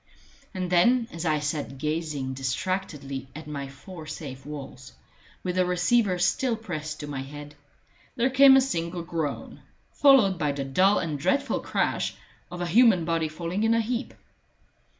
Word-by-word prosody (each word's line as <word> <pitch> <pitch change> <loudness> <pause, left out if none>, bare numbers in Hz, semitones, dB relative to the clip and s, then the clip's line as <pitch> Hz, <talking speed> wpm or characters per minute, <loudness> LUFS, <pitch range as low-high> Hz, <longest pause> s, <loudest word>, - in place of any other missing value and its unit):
And 185 -1 -3
then, 230 +7 +4
as 170 0 -4
I 155 -1 +2
sat 150 -2 -3
gazing 150 -2 -2
distractedly 135 0 -3
at 155 +1 -8
my 140 -2 -5
four 155 +4 -11
safe 140 -4 -8
walls, 140 -3 -9 0.5
with 180 0 -2
the 185 - +4
receiver 180 +2 +2
still 230 +8 +1
pressed 155 -9 -6
to - - -5
my 140 -2 -4
head, 145 +2 -9 0.6
there 250 +2 +1
came 265 +1 +8
a - - +6
single 170 -8 -2
groan, 165 -4 -4 0.3
followed 245 - +5
by 150 -3 0
the 140 0 -3
dull 185 +9 +3
and 155 -4 -2
dreadful 280 - +1
crash - - -1 0.3
of 180 0 -7
a - - 0
human 195 -2 +5
body 165 -1 0
falling 170 +5 -4
in 225 +1 +3
a - - +3
heap. 235 +3 -3
170 Hz, 160 wpm, -26 LUFS, 145-195 Hz, 0.6 s, came